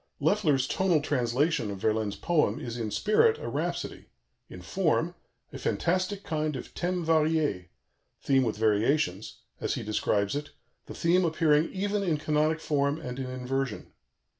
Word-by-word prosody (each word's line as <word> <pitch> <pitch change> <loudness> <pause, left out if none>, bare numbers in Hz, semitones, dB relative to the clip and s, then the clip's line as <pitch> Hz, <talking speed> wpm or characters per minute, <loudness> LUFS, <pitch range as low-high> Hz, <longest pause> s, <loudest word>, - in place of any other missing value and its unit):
" - - -49
Loeffler's 150 -11 +2
tonal 185 -2 +2
translation 140 -1 0
of 100 - -4
Verlaine's 110 0 0
poem 150 -11 +1
is 120 -1 -5
in 115 -3 -3
spirit 325 - +3
a - - -6
rhapsody, - - -3 0.4
in - - -9
form - - 0 0.4
"a - - -6
fantastic 185 +3 -1
kind 155 -2 -2
of 125 - -7
thème 180 -1 -2
varié" 155 - +1 0.5
(theme 135 -1 +3
with 115 -4 -1
variations), 110 - +1 0.2
as - - -1
he - - -4
describes 105 -1 0
it, 145 0 -5 0.3
"the - - -8
theme 175 +2 +3
appearing 160 -1 +2
even 205 +2 -1
in 170 -6 +1
canonic 155 +1 +1
form 145 -1 0
and 125 +1 -6
in 130 -1 -4
inversion." 130 -1 -3
150 Hz, 155 wpm, -28 LUFS, 120-165 Hz, 0.5 s, spirit